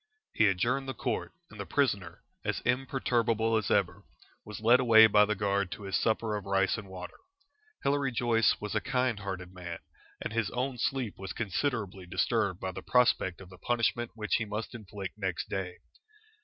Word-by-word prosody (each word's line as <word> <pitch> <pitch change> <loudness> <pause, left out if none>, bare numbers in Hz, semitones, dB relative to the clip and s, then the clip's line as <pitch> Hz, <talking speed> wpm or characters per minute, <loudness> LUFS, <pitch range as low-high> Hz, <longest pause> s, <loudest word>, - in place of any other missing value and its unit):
He 110 - +4
adjourned 120 +8 +1
the 135 - -4
Court, 120 -4 -2 0.2
and 105 - -12
the 100 - -4
prisoner, 100 - 0 0.2
as - - -2
imperturbable 120 -3 +1
as 105 -3 0
ever, - - +1 0.4
was 105 - -8
led 120 +3 +5
away 115 -3 +8
by 105 -1 +6
the 105 0 -1
guard 100 -2 0
to 105 - -9
his 95 -1 -2
supper 110 -1 +1
of 100 -2 -5
rice 95 0 +2
and 105 -3 -7
water. 95 -1 -8 0.7
Hilary 140 -1 +1
Joyce 115 -1 +3
was 105 -1 -4
a - - +1
kind 125 -4 0
hearted 95 -2 -6
man, 90 -2 -6 0.4
and - - -5
his 115 -3 0
own 125 0 -2
sleep 125 -3 -1
was 95 -2 -5
considerably 100 -4 -2
disturbed 95 +1 0
by 95 - -3
the - - -7
prospect 120 -7 +2
of 95 -1 -12
the 90 - -13
punishment 120 +1 0
which 105 -2 0
he 110 - -2
must 105 +1 -5
inflict 105 -3 -7
next 95 -4 -2
day. 95 -2 -3
105 Hz, 185 wpm, -30 LUFS, 95-120 Hz, 0.7 s, away